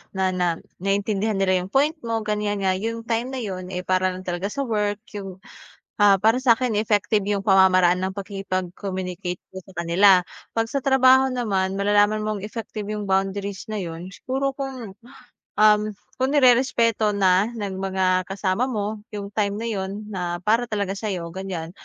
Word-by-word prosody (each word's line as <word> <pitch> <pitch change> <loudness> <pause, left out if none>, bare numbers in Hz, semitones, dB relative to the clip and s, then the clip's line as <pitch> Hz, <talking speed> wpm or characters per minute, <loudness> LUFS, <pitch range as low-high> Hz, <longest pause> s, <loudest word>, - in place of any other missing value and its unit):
na, 190 -1 +1
na 180 -2 0 0.2
naiintindihan 200 +2 0
nila 185 -1 +2
'yung 180 - -5
point 275 +9 +2 0.2
mo, 225 -1 -1
ganyan 210 -1 -1
nga 190 - +3
'yung 225 +4 -3
time 230 +1 -1
na 265 - -6
'yun, 190 -7 -5
eh, 180 -1 -5
para 185 0 +1
lang 185 - -8
talaga 180 +2 -3
sa 275 +6 -3
work 210 -4 -1
'yung, 195 -3 -8 0.6
ah, 195 -2 +6
para 220 +3 +4
sa'kin 240 -2 +3
effective 210 -1 +1
yung 205 -1 0
pamamaraan 185 -2 +5
ng 190 - -2
pakikipag-communicate 185 -2 -4
ko - - -16
sa 190 - -16
kanila. 180 +2 +5 0.3
Pag 225 0 0
sa 275 +2 -3
trabaho 265 0 +5
naman 195 -6 0
malalaman 205 +1 +3
mong 210 -2 -3
effective 215 -1 -6
'yung 210 -1 -4
boundaries 195 +1 -1
na 210 - -2
'yun, 175 +1 -7
siguro 270 +5 -2
kung, 265 -6 -6 0.6
um, 210 0 +5 0.4
kung 260 - +2
nirerespeto 235 -5 +3
na 190 +1 +3
ng 200 -4 -4
mga 185 -1 +1
kasama 195 +4 -1
mo 215 -3 -3 0.2
'yung 200 -1 -6
time 205 -1 0
na 225 +2 -4
'yun 190 -3 -3 0.2
na 175 -2 -3
para 230 +4 +2
talaga 205 -3 -2
sayo 185 -6 -4
ganyan. 180 -3 -5
200 Hz, 170 wpm, -23 LUFS, 190-220 Hz, 0.6 s, ah